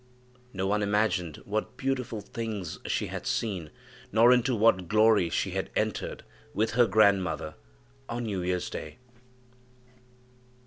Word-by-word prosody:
No 95 -3 -3
one 105 +2 +1
imagined 100 -6 0
what 105 +2 -3
beautiful 125 -5 -2
things 105 -5 -5
she - - 0
had - - -6
seen, 95 -9 -2 0.4
nor 115 +4 +6
into 125 0 +2
what 105 -5 +3
glory 110 -3 +4
she - - -1
had - - -3
entered - - -2 0.3
with 110 +2 +1
her 120 +2 +4
grandmother, 95 -6 +2 0.6
on 120 0 -3
New 100 -5 -2
year's 90 0 -2
day. 75 - -7
105 Hz, 130 wpm, -28 LUFS, 95-115 Hz, 0.6 s, nor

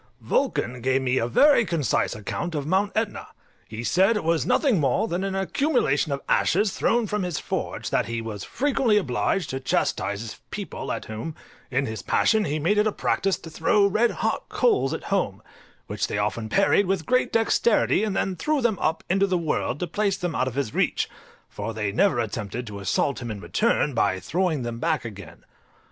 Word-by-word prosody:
Vulcan 125 +1 -1
gave 130 +2 +1
me 130 0 +1
a 115 - 0
very 280 - +5
concise 165 - 0
account 160 - -4
of 145 -2 -2
Mount 190 +5 +1
Etna: 220 -1 -2 0.4
he 110 +1 -6
said 195 - +3
it - - -3
was 165 -4 +1
nothing 260 - +3
more 140 - +1
than 180 -1 -2
an 195 -1 -2
accumulation 195 - +1
of 140 0 -2
ashes 200 +3 +2
thrown 235 0 +1
from 210 0 -2
his 180 -4 -2
forge; - - -4
that - - +1
he 115 0 -3
was 110 -3 -6
frequently 260 -5 +1
obliged 180 +2 0
to 130 - -3
chastise 100 -5 -1
his 115 -2 -8
people, - - -5
at - - -4
whom, 110 +9 -6 0.3
in 130 +2 0
his 110 -2 -5
passion, 220 -2 +2
he 150 - -1
made 185 +8 +2
it 210 - +3
a - - +1
practice 195 -1 0
to 165 - -11
throw 200 +6 +3
red 215 +4 +3
hot - - -2
coals 450 -5 +2
at - - -4
home, - - 0 0.5
which - - -2
they - - -3
often 110 -2 -2
parried 200 - +3
with 185 -4 -1
great 255 0 +2
dexterity, 225 -1 +2
and 210 -3 -1
then 190 -1 0
threw 305 - 0
them 235 -6 +1
up 160 +1 0
into 195 +2 +2
the 185 -2 +1
world 155 -4 -1
to - - -1
place 200 +3 0
them 175 -2 -3
out 130 - 0
of 130 - -4
his 135 -6 -2
reach, - - +1 0.4
for 115 - -6
they 105 -2 -1
never 130 - +2
attempted 115 +1 -3
to 105 -2 -7
assault 100 +8 0
him 120 - -5
in 105 -2 -5
return 150 - +1
by 95 -5 +1
throwing 160 - -1
them 120 -1 -4
back 160 -3 0
again. 100 -3 -10
165 Hz, 200 wpm, -25 LUFS, -, 0.5 s, very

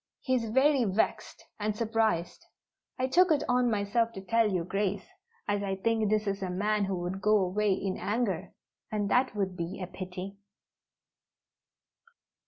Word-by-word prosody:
He 260 - -1
is 230 -3 0
very 265 +3 +4
vexed 205 0 -1
and 210 0 -1
surprised. 220 -7 0 0.5
I 255 - +1
took 360 +8 +4
it 290 -2 +3
on 250 0 +3
myself 220 +2 +1
to 195 - -7
tell 225 +2 +2
Your 180 -3 -1
Grace, 195 0 -1 0.4
as 205 0 0
I 195 -1 -1
think 220 +1 +1
this 215 0 +1
is 200 -1 -2
a 190 - -2
man 205 +3 +1
who 195 0 -2
would 185 +2 -4
go 210 +1 +4
away 200 +2 +1
in 190 0 -2
anger; 210 -5 -1 0.4
and 205 -2 -1
that 250 -3 +2
would 190 -3 -1
be 170 +1 -4
a 185 - -3
pity." 185 +2 -7
205 Hz, 165 wpm, -29 LUFS, 190-230 Hz, 0.5 s, very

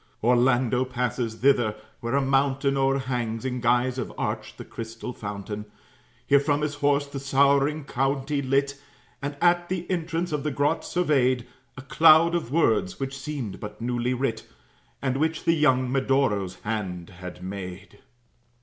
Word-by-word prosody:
Orlando 125 +1 +3
passes 125 -2 -2
thither, 120 -4 +2 0.2
where 115 +3 -2
a 140 - +2
mountain 135 +1 +2
O'erhangs 130 -4 -1
in 125 -1 -2
guise 125 +2 +2
of 125 - -4
arch - - -3
the - - -8
crystal 115 +2 -7
fountain. 105 0 -6 0.6
Here 140 - +5
from 145 +1 0
his 150 -1 -1
horse 145 0 +1
the 140 -1 -6
sorrowing 140 +2 +2
county 135 +2 -1
lit, 140 +1 0 0.4
And 145 +1 -4
at 175 0 +3
the 180 -2 -2
entrance 170 0 -2
of 150 -1 -1
the 150 - -1
grot 145 +1 0
surveyed 130 -8 +1 0.3
A 130 - -8
cloud 165 +3 +6
of 170 -8 -2
words, 115 - +1
which 135 0 -3
seemed 135 -7 -5
but 105 0 -8
newly 120 +1 -1
writ, 125 -2 -2 0.6
And 130 -1 0
which 160 +2 0
the 165 - +3
young 130 -5 +3
Medoro's 130 -8 +1
hand 95 -5 -4
had 90 0 -9
made. 95 +1 -7
135 Hz, 150 wpm, -25 LUFS, 115-140 Hz, 0.6 s, cloud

